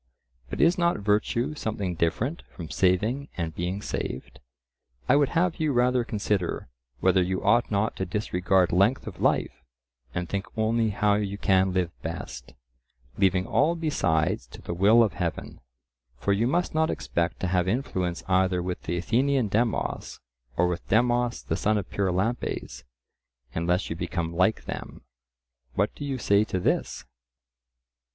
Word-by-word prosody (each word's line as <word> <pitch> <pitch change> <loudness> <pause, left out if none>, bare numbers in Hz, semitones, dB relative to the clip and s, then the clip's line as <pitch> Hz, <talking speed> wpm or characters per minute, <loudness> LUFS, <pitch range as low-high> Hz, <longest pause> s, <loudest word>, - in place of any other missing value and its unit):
But - - -5
is 170 +2 +4
not 170 0 +2
virtue 105 +7 0
something 105 -9 -3
different 110 - -1
from 80 -3 -9
saving 110 +10 +1
and 85 -2 -2
being 90 +5 -3
saved? 65 - -5 0.7
I 130 - +5
would 145 -1 +3
have 180 0 +2
you 155 -3 +1
rather 125 0 +3
consider 100 - -2 0.3
whether 95 0 +4
you 95 +1 -1
ought 115 +4 +3
not 105 +1 0
to 95 - -1
disregard 95 -2 +1
length 100 +9 +3
of 95 -5 -8
life, - - +1 0.5
and 90 +3 -3
think 100 +1 -3
only 110 +1 +2
how 105 0 +2
you 100 -1 -2
can 95 -2 +3
live 90 -2 0
best, 65 -6 -7 0.6
leaving 95 -1 +3
all 170 +3 +2
besides 80 - 0
to - - -12
the - - -4
will 105 +7 +6
of 110 - 0
Heaven. 85 -8 -4 0.6
For 100 +10 +1
you 110 +4 +1
must 175 +7 0
not 160 0 +2
expect 85 0 -2
to 95 - 0
have 90 0 +1
influence 95 -6 -1
either 95 -1 +2
with 90 0 -4
the 85 - -3
Athenian 125 +5 +1
Demos 115 +3 -1 0.4
or 90 - +4
with 90 0 -4
Demos 120 +2 +2
the - - -1
son 110 +1 +1
of 100 - -3
Pyrilampes, 100 +5 -1 0.7
unless 90 +2 0
you - - -2
become 85 -1 -3
like 95 +5 +2
them. - - -7 0.7
What 100 +2 +1
do - - -8
you 140 -2 -2
say 100 -3 +3
to 95 - -2
this? - - -1
100 Hz, 155 wpm, -26 LUFS, 90-120 Hz, 0.7 s, will